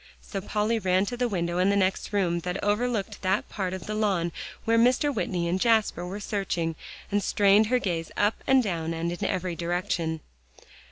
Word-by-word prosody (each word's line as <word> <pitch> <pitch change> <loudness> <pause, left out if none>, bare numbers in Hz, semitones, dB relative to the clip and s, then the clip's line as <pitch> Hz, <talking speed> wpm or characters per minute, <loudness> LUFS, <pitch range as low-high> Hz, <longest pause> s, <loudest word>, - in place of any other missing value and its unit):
So 195 - -6
Polly 215 +3 0
ran 185 0 +2
to 245 - -4
the 245 0 0
window 175 -3 -1
in 185 +2 +4
the 200 - +3
next 190 +1 0
room 180 -4 +1
that 180 +2 -3
overlooked 210 0 -1
that 190 +1 0
part 190 -3 -3
of 190 -1 -6
the 215 - -4
lawn 195 -6 +1 0.3
where 230 0 +3
Mr. 255 +5 +3
Whitney 180 -6 -1
and 185 +2 0
Jasper 220 -6 +2
were 195 +3 -5
searching, 185 -6 -2 0.4
and 205 0 +2
strained 205 +2 +4
her 250 +3 +3
gaze 170 -8 -2
up 205 +2 +1
and 265 -1 +5
down, 165 -5 -2
and 165 +1 -2
in 175 - -5
every 180 -1 -2
direction. 170 -2 -2
195 Hz, 190 wpm, -27 LUFS, 175-215 Hz, 0.4 s, and